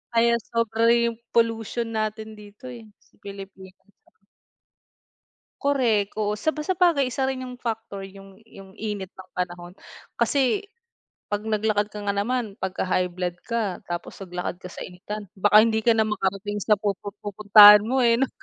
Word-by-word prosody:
Kaya 235 0 +4
sobra 230 0 +1 0.2
yung 230 -1 -2 0.2
pollution 230 0 0
natin 215 0 -3
dito 210 +3 -15
eh 235 -4 -10
sa - - -32
Pilipinas. 195 -1 -11 1.8
Korek, 235 -8 +1
oo, 210 0 -2
saba 310 -1 -1
sabagay, 335 -7 +2
isa 265 +1 -1
rin 260 -1 -3
yung 250 -1 -9
factor, 225 -3 -5
yung 195 +1 -15
yung 195 -3 -14
init 205 -3 -4
ng 185 0 -14
panahon. 175 0 -5 0.4
Kasi 280 +9 +1 0.6
'pag 205 0 -3
naglakad 215 -1 0
ka 210 - -8
nga 200 - 0
naman, 220 +1 -2
pagka 190 0 -2
high 180 0 0
blood 180 0 -3 0.2
ka 220 -6 -2
tapos 175 +3 -6
naglakad 180 -1 -5
ka 180 - -8
sa - - -8
initan 205 +4 -7
baka 205 +2 +4
hindi 220 -1 +1
ka 230 0 +3
na 220 - +3
makarating 205 0 -2
sa 210 +1 +3
pupu 205 -1 -3
pupuntahan 205 0 +8
mo 250 +5 -1
eh, 235 -1 +5
'no? 270 - +1
210 Hz, 155 wpm, -24 LUFS, 195-230 Hz, 1.8 s, pupuntahan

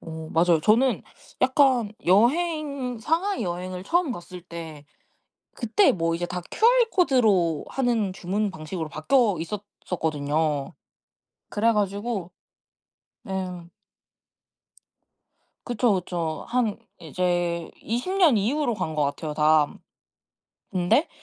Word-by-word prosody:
어 160 -1 -8
맞아요. 165 -1 +3
저는 235 +8 +3 0.4
약간 260 -5 +3
여행 275 - +2
상하이 335 - 0
여행을 180 +1 -4
처음 345 - +1
갔을 180 -3 -9
때 165 -4 -9 0.7
그때 240 - +3
뭐 165 -2 0
이제 175 +1 -3
다 180 +1 -4
QR코드로 265 - +3
하는 235 -7 0
주문 200 +3 -2
방식으로 160 -1 -6
바뀌어 205 - +2
있었었거든요. 160 -6 -2 0.8
그래가지고 205 -3 0 1.0
예. 185 -2 -4 2.0
그쵸 240 -3 +1
그쵸. 170 -3 -3
한 235 -4 0 0.2
이제 175 0 -1
20 245 - -2
년 335 - +5
이후로 240 +5 0
간 180 -6 -3
거 150 - +1
같아요 150 +2 -3
다. 150 -1 +3 1.0
근데 185 - +2
190 Hz, 210 characters per minute, -25 LUFS, 170-245 Hz, 2.0 s, 년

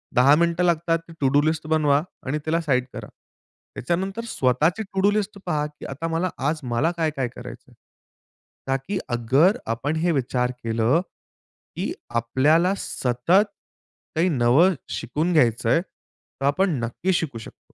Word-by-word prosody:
10 135 +4 +6
मिनिटं 170 +2 +1
लागतात. 165 -1 +2 0.2
To 135 - +2
do 145 +2 +4
list 155 +1 -1
बनवा 150 -2 +3 0.2
आणि 140 +3 -1
त्याला 165 +2 +1
साइड 130 -5 +1
करा. - - -7 0.7
त्याच्यानंतर 190 - -2
स्वतःची 155 - +1
टू 195 -1 -5
डू 205 +1 +4
लिस्ट 210 -1 -2
पहा, 150 -4 0
की 150 0 -12
आता 140 +5 -4
मला 165 +3 -1 0.2
आज 160 - -2
मला 125 +6 0
काय-काय 155 -6 -1
करायचं 120 - -10
आहे. - - -19 0.9
ताकी 135 +9 -2
अगर 130 - +3 0.2
आपण 145 +7 -2
हे 170 +2 +1
विचार 125 -3 0
केलं, 115 +7 +2 0.7
की - - -2 0.3
आपल्याला 150 +10 +2
सतत 135 - +1 0.7
काही 170 +4 +2
नवं 140 +6 +4 0.2
शिकून 155 +8 -2
घ्यायचं 115 -7 +2
आहे, 165 +8 +4
तर 135 -6 -12
आपण 185 +7 +2
नक्कीच 175 +11 -1
शिकू 140 -9 -2
शकतो. 110 - -13
155 Hz, 150 wpm, -23 LUFS, 130-170 Hz, 0.9 s, 10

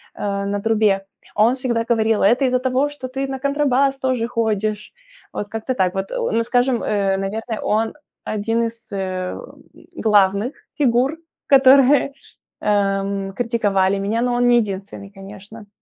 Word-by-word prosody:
э, 200 -1 -3
на 200 0 -2
трубе. 210 -3 +1 0.3
Он 220 +4 +4
всегда 235 -3 -1
говорил: 225 -2 +2
"Это 245 +7 +4
из-за 255 0 +2
того, 260 +3 0
что 290 -3 -8
ты 270 +1 -4
на 265 -1 -4
контрабас 275 -1 +1
тоже 255 -3 -1
ходишь". 215 - -2 0.4
Вот 205 - -4
как-то 225 +4 -3
так. 185 -6 0
Вот, 195 0 -4
о 230 +1 0
скажем, 245 +1 +1
э, 195 -2 0
наверное, 220 +3 -4
он- 220 +1 0 0.4
1 225 +3 0
из, 230 0 -6
э, 185 -1 -3 0.6
главных 205 +2 +2 0.3
фигур, 265 +2 +2 0.3
которые, 275 +1 +5 0.5
эм, 195 -1 0
критиковали 200 -4 +1
меня. 215 +4 -1
Но 245 0 0
он 245 0 +2
не 240 0 +5
единственный, 200 0 -7
конечно. 205 +2 -12
225 Hz, 145 wpm, -20 LUFS, 200-250 Hz, 0.6 s, которые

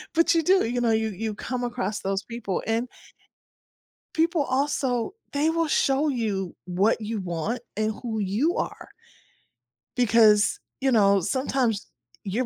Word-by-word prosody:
but 335 +1 +4
you 330 - +4
do, 375 -2 +4
you 245 +2 -1
know, 230 -1 +2
you 220 0 +1
you 215 +2 -4
come 250 +3 -4
across 235 -4 -3
those 195 +1 -2
people 230 -5 -4
and 230 +3 0 1.3
people 325 -1 +2
also 260 - 0 0.2
they 295 +3 +2
will 330 -1 +1
show 280 +1 +2
you 210 - -2
what 195 +6 +1
you 215 0 -3
want 185 +6 -3 0.2
and 215 +1 0
who 220 -2 -2
you 215 - 0
are - - -4 1.1
because, 220 -3 +4 0.2
you 270 -1 +2
know, 200 -4 +4
sometimes 255 -2 0 0.4
you're 220 +6 -1
230 Hz, 145 wpm, -25 LUFS, 210-270 Hz, 1.3 s, but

